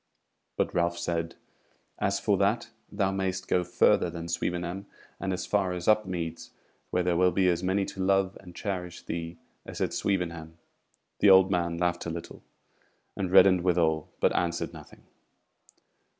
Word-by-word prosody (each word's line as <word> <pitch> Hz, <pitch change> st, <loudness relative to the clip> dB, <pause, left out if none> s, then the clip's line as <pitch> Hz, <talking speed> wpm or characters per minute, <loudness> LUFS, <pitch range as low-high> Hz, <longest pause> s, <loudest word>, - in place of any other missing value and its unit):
But -, -, 0 dB
Ralph 85 Hz, 0 st, +1 dB
said: 85 Hz, -1 st, -2 dB, 0.6 s
"As -, -, 0 dB
for -, -, +2 dB
that, -, -, +1 dB, 0.2 s
thou 95 Hz, -1 st, 0 dB
mayst 95 Hz, -1 st, -2 dB
go 90 Hz, -, +2 dB
further 90 Hz, 0 st, +3 dB
than 85 Hz, 0 st, -6 dB
Swevenham, 90 Hz, +3 st, -3 dB, 0.3 s
and 95 Hz, -, -2 dB
as 90 Hz, 0 st, -3 dB
far 95 Hz, -3 st, 0 dB
as 90 Hz, -1 st, -5 dB
Upmeads, 90 Hz, -6 st, 0 dB, 0.4 s
where 90 Hz, -, 0 dB
there 90 Hz, -1 st, +1 dB
will 90 Hz, +1 st, +4 dB
be 95 Hz, +2 st, +2 dB
as 85 Hz, -1 st, +2 dB
many 95 Hz, +2 st, +1 dB
to 95 Hz, -, -5 dB
love 95 Hz, 0 st, +2 dB
and 90 Hz, -2 st, -14 dB
cherish 90 Hz, -4 st, -5 dB
thee 85 Hz, 0 st, -5 dB, 0.3 s
as -, -, -8 dB
at -, -, -1 dB
Swevenham." 85 Hz, -4 st, -2 dB, 0.6 s
The 100 Hz, -, +6 dB
old 95 Hz, 0 st, +7 dB
man 85 Hz, -2 st, 0 dB
laughed 85 Hz, 0 st, -1 dB
a -, -, -2 dB
little, 85 Hz, 0 st, -7 dB, 0.7 s
and 95 Hz, -2 st, -2 dB
reddened 95 Hz, -1 st, +7 dB
withal, 80 Hz, -4 st, +1 dB
but -, -, +2 dB
answered 85 Hz, -1 st, -1 dB
nothing. -, -, -13 dB
90 Hz, 160 wpm, -28 LUFS, 85-95 Hz, 0.7 s, old